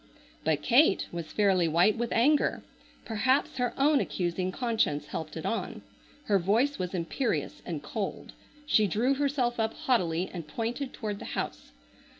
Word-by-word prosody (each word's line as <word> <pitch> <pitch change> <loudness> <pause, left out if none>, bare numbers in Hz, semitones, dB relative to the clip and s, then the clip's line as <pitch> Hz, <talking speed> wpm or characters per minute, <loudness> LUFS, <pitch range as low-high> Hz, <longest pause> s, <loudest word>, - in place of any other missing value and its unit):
But - - 0
Kate - - +4
was 170 -2 -6
fairly 190 -5 +3
white 175 +6 +4
with 235 0 -2
anger. 285 +6 +2 0.4
Perhaps 260 +5 +1
her 245 -2 0
own 285 +1 +4
accusing 180 +1 -1
conscience 225 - 0
helped 160 0 -6
it 160 - -6
on. 230 - -3 0.4
Her 205 -7 +2
voice 225 +10 +1
was 180 0 -3
imperious 180 +9 -2
and - - -4
cold. - - -5 0.3
She 215 -8 +4
drew 230 +9 +1
herself 270 -4 0
up 220 0 0
haughtily 180 -8 +1
and 170 -4 -6
pointed 240 - -3
toward 210 -3 -5
the - - -8
house. - - -4
215 Hz, 150 wpm, -29 LUFS, 180-255 Hz, 0.4 s, Kate